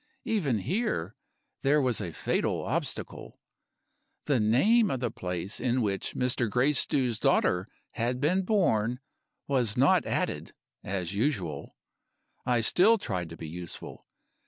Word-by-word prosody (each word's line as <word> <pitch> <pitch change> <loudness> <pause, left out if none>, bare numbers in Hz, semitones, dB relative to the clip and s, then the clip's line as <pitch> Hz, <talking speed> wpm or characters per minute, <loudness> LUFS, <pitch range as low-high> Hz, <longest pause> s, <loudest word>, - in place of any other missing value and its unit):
Even 190 - +1
here, 105 - -1 0.5
there 145 +2 +3
was 125 -5 +1
a 85 - -4
fatal - - -1
obstacle. - - -4 0.9
The 140 -5 +2
name 200 - +4
of 130 - -1
the 125 - -2
place 90 +3 -4
in 125 0 +1
which 100 -3 -2
Mr. 125 -2 0
Gracedieu's 125 -1 +2
daughter 90 +3 +2 0.2
had 120 +2 -2
been 170 +7 +2
born 125 - +1 0.5
was 125 -6 +1
not - - +4
added, - - -2 0.3
as 90 -2 -3
usual. 100 - -2 0.7
I 120 -2 +3
still 200 - +5
tried 90 - -3
to 80 - -9
be 80 - -7
useful. 85 +2 -8
120 Hz, 130 wpm, -28 LUFS, 100-145 Hz, 0.9 s, still